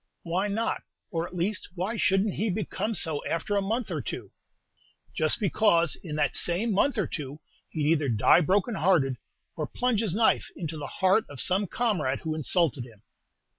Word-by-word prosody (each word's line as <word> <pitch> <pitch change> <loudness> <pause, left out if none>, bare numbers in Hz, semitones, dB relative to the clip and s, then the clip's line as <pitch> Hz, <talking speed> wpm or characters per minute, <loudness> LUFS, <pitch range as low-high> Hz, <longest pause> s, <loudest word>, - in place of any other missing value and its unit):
"Why 180 +4 0
not? 220 +3 -1 0.3
or, 165 -1 -1
at 180 - -12
least, 185 +4 -1
why 190 +6 -2
should 195 -2 +2
n't 205 - -1
he 220 +2 -1
become 215 +3 -2
so 155 -6 -1
after 165 +5 -1
a 200 - +2
month 215 +2 -2
or 155 -4 -2
two?" - - -6 0.8
"Just 155 +7 +1
because 190 -5 +3
in 155 -5 -7
that 145 -2 +1
same 190 +7 +1
month 240 +6 +2
or 205 - +2
two 145 0 -6 0.3
he'd 155 -3 -2
either 155 -3 +2
die 115 +9 +5
broken 200 - +1
hearted, 160 - +2 0.4
or - - -3
plunge 245 -4 0
his 200 -6 -1
knife 225 +1 +3
into 165 -2 -5
the 150 - -5
heart 190 +4 +2
of 145 -3 -9
some 190 +6 +1
comrade 175 - 0
who 160 -1 -2
insulted 155 -4 +1
him." 115 -3 -15
180 Hz, 185 wpm, -27 LUFS, 155-210 Hz, 0.8 s, die